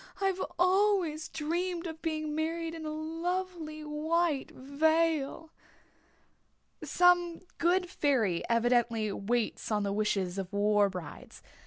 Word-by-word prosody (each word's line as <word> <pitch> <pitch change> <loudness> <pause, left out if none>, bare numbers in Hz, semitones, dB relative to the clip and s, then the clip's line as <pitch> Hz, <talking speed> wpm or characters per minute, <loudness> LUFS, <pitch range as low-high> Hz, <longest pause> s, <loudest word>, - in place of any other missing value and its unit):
"I've 385 -1 0 0.2
always 365 -4 +2
dreamed 340 +3 -2
of 320 -1 -6
being 310 -2 -2
married 325 +1 -2
in 320 -1 -6
a - - -3
lovely 325 0 -4
white 305 0 0
veil." 315 +2 0 1.3
Some 355 -1 +3 0.2
good 360 +2 +2
fairy 255 - +1
evidently 230 -2 +2
waits 225 +3 -2
on 210 -1 +1
the 200 0 -1
wishes 200 -3 0
of 190 -2 -5
war 205 0 +3
brides. 180 -5 -9
310 Hz, 115 wpm, -30 LUFS, 230-340 Hz, 1.3 s, Some